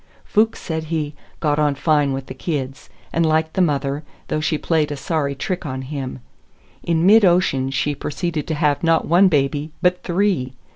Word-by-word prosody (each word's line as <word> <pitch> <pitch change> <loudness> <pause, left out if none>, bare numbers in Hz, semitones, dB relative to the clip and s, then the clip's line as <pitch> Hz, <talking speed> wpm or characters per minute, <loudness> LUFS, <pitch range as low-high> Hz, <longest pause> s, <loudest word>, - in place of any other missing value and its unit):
Fuchs 220 +1 +2
said 160 -2 -4
he 155 -2 -2 0.3
"got 150 -1 +1
on 145 -2 +2
fine 145 -1 +2
with 135 0 -3
the - - -8
kids," 135 -1 -4 0.2
and 165 - +2
liked 160 0 +1
the 190 - +1
mother, 140 -3 0 0.3
though - - 0
she 155 0 0
played 155 -2 0
a 145 - -3
sorry 145 -2 -1
trick 180 +7 -3
on 130 -4 -4
him. 130 -2 -5 0.6
In 165 0 +1
mid 215 +3 +7
ocean 175 -8 +3
she 140 +2 0
proceeded 150 +2 -3
to 160 - -1
have 150 -1 +1
not 165 -1 +2
one 180 +4 +5
baby, 145 -1 0
but 180 0 +2
three! 175 -8 0
155 Hz, 185 wpm, -21 LUFS, 140-170 Hz, 0.6 s, mid